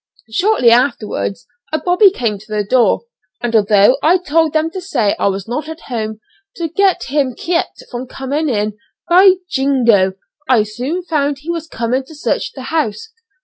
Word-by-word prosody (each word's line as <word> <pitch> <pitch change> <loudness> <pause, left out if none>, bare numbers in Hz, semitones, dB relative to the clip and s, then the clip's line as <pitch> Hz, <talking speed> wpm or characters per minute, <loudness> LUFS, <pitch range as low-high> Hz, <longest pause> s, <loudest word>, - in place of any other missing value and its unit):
Shortly 265 - +3
afterwards 225 - 0 0.3
a 315 - +1
bobby 360 +6 +4
came 230 - -2
to 215 - -17
the 210 -1 0
door, 240 +4 +2 0.4
and 235 -1 -2
although 210 +4 +4
I 345 +4 +4
told 325 -2 +1
them 315 +1 0
to 375 +1 -6
say 245 - 0
I - - +2
was 195 0 -2
not 300 +7 -4
at 320 0 -8
home, 220 -3 -5 0.3
to 335 - -3
get 385 +3 +1
him 270 -3 -1
kept 340 0 -2
from 250 +1 -5
coming 280 +4 -2
in, 210 -3 -1 0.3
by 370 +2 +7
jingo! 240 - +2 0.4
I 240 -5 +5
soon 250 +12 -4
found 290 -4 -1
he 330 +3 -4
was 330 -1 -4
coming 245 0 -2
to 315 - -13
search 300 - -2
the 265 - -8
house. 325 - -1
265 Hz, 175 wpm, -16 LUFS, 220-325 Hz, 0.4 s, by